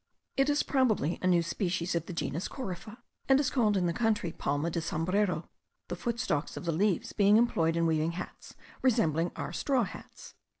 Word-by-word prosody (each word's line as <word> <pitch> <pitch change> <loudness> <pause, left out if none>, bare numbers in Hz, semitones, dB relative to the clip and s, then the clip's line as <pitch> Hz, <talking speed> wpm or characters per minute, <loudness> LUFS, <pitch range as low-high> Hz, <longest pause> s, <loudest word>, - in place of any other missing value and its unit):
It 270 +1 +2
is 290 0 +2
probably 220 - +1
a 185 - +1
new 175 -2 +4
species 175 0 -1
of 170 -1 -2
the - - -5
genus 165 +1 -2
corypha; 215 -3 -7 0.3
and 270 0 +6
is 280 -3 +1
called 215 -6 +2
in 180 - +1
the 170 - +1
country 215 -6 0
palma 145 +2 -1
de 170 - -1
sombrero, 175 +2 0 0.4
the - - -2
footstalks 235 - -2
of - - -6
the 170 - +1
leaves 190 +3 0
being 205 +1 +5
employed 165 -9 +2
in 170 0 +2
weaving 160 0 +1
hats 180 +1 -8 0.3
resembling 175 - +2
our - - -5
straw 265 -4 +1
hats. 185 - -9
180 Hz, 185 wpm, -30 LUFS, 165-225 Hz, 0.4 s, and